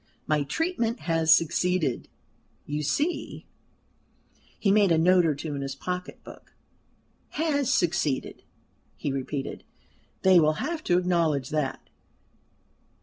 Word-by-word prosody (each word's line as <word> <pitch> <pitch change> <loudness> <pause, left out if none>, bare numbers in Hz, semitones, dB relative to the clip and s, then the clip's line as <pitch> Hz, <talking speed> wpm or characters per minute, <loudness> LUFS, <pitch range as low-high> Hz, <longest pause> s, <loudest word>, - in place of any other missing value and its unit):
"My 150 -1 +1
treatment 235 - -2
has 165 -1 +1
succeeded, 165 -3 +2 0.6
you 150 +1 -3
see" 290 - -2 1.1
he 200 - +1
made 200 -3 +4
a 165 - +4
note 175 +1 +4
or 150 - +1
two 150 +1 -5
in 140 - -4
his 135 -1 -4
pocket 180 +5 -6
book - - -14 0.8
"has 285 -4 +1
succeeded," 160 -6 0 0.6
he 145 - -3
repeated. 135 +1 -4 0.6
"They 185 -2 +6
will 155 -1 +3
have 310 - -4
to 175 - +3
acknowledge 165 -7 +1
that." 150 -3 -2
165 Hz, 120 wpm, -26 LUFS, 150-190 Hz, 1.1 s, They